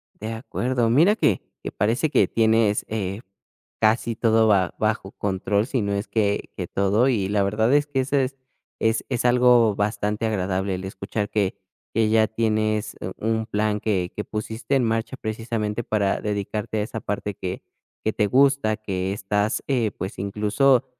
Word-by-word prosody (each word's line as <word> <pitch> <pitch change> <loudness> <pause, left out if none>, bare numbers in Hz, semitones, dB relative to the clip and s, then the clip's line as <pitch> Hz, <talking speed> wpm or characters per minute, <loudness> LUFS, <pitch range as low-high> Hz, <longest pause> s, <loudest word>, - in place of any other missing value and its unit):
De 110 +2 -5
acuerdo. 120 0 -1
Mira 165 - +5
que 105 - +2 0.2
que - - -5
parece 115 +9 +1
que - - +3
tienes, 110 -2 +2
eh, 100 -2 -3 0.6
casi 115 +1 +2
todo 110 0 +3
ba 95 -4 +3
bajo 110 -3 -1
control, 100 +2 -1
si 130 - 0
no 100 -1 -1
es 100 +2 -2
que 105 -2 0
que 90 - -3
todo. 100 +8 +2
Y 105 -7 +1
la 100 -1 +2
verdad 110 +5 +1
es 145 0 +4
que 140 -2 -1
eso 135 +2 -1
es 135 0 0 0.4
es 110 0 +1
es 125 -2 -1
algo 120 -3 +5
bastante 105 +1 -1
agradable, 95 -2 -1
el 95 +1 -6
escuchar 100 +1 -4
que 100 -3 0 0.4
que 110 -1 +2
ya 110 0 +4
tienes, 110 -1 0
eh, - - -4
un 110 0 0
plan 105 -1 0
que 95 -5 0
que 105 - -3
pusiste 110 +5 -3
en 130 - +3
marcha 115 +3 -1
precisamente 110 -1 -3
para 100 -3 0
dedicarte 105 +1 -2
a - - +1
esa 115 +1 -5
parte 105 0 -3
que 90 0 -5 0.4
que 110 - +1
te 105 - +1
gusta, 135 -3 +3
que 95 -3 -3
estás, 105 +2 -1
eh, 120 -6 +1
pues, 95 +1 -6
incluso, 105 +7 +2
110 Hz, 175 wpm, -24 LUFS, 100-115 Hz, 0.6 s, Mira